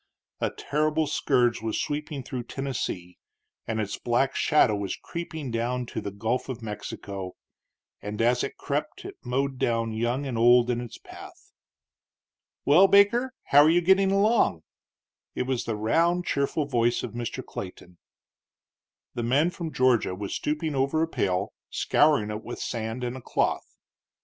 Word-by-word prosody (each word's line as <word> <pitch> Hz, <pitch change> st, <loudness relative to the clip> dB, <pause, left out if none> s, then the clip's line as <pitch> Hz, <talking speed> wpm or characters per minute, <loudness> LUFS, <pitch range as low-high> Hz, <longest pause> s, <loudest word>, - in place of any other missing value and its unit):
A -, -, 0 dB
terrible 155 Hz, +2 st, 0 dB
scourge 125 Hz, -6 st, +1 dB
was 110 Hz, -1 st, -2 dB
sweeping 150 Hz, -1 st, -3 dB
through 125 Hz, -1 st, -5 dB
Tennessee, 120 Hz, -10 st, -4 dB, 0.5 s
and 115 Hz, -1 st, -2 dB
its 105 Hz, -2 st, -3 dB
black 120 Hz, +3 st, +1 dB
shadow 125 Hz, -8 st, +3 dB
was 100 Hz, -2 st, -3 dB
creeping 165 Hz, -6 st, -6 dB
down 120 Hz, +2 st, -1 dB
to -, -, -5 dB
the 100 Hz, -, -4 dB
Gulf 110 Hz, +7 st, -2 dB
of 125 Hz, -2 st, -5 dB
Mexico; 100 Hz, -3 st, -6 dB, 0.7 s
and 105 Hz, +1 st, -6 dB
as 120 Hz, +2 st, +3 dB
it -, -, -5 dB
crept -, -, -3 dB
it -, -, -8 dB
mowed 135 Hz, +1 st, -1 dB
down 115 Hz, -1 st, 0 dB
young 120 Hz, +5 st, -1 dB
and 125 Hz, -4 st, -3 dB
old 120 Hz, +1 st, +5 dB
in 120 Hz, 0 st, -1 dB
its 120 Hz, -2 st, -8 dB
path. -, -, -13 dB, 1.1 s
"Well, 170 Hz, +8 st, +7 dB
Baker, 205 Hz, +7 st, +4 dB
how 145 Hz, -, +6 dB
are 150 Hz, -, +6 dB
you 170 Hz, +2 st, +5 dB
getting 190 Hz, +2 st, +4 dB
along?" 200 Hz, -, +2 dB, 0.7 s
It -, -, 0 dB
was 130 Hz, -1 st, -2 dB
the 115 Hz, -, -2 dB
round, 170 Hz, +12 st, +2 dB
cheerful 140 Hz, +2 st, 0 dB
voice 120 Hz, -3 st, +1 dB
of -, -, -4 dB
Mr. 120 Hz, +2 st, -5 dB
Clayton. 90 Hz, -2 st, -9 dB, 1.1 s
The 120 Hz, -, -3 dB
man 140 Hz, +9 st, +2 dB
from 170 Hz, -3 st, -5 dB
Georgia 125 Hz, -8 st, +2 dB
was 100 Hz, +1 st, -5 dB
stooping 150 Hz, +1 st, -2 dB
over 140 Hz, +4 st, +1 dB
a -, -, 0 dB
pail, 100 Hz, -, -1 dB, 0.2 s
scouring 145 Hz, -9 st, +2 dB
it 105 Hz, +1 st, -5 dB
with 120 Hz, -, -6 dB
sand 115 Hz, +1 st, -4 dB
and 125 Hz, +1 st, -3 dB
a 130 Hz, -, -8 dB
cloth. -, -, -1 dB
125 Hz, 160 wpm, -26 LUFS, 115-150 Hz, 1.1 s, Well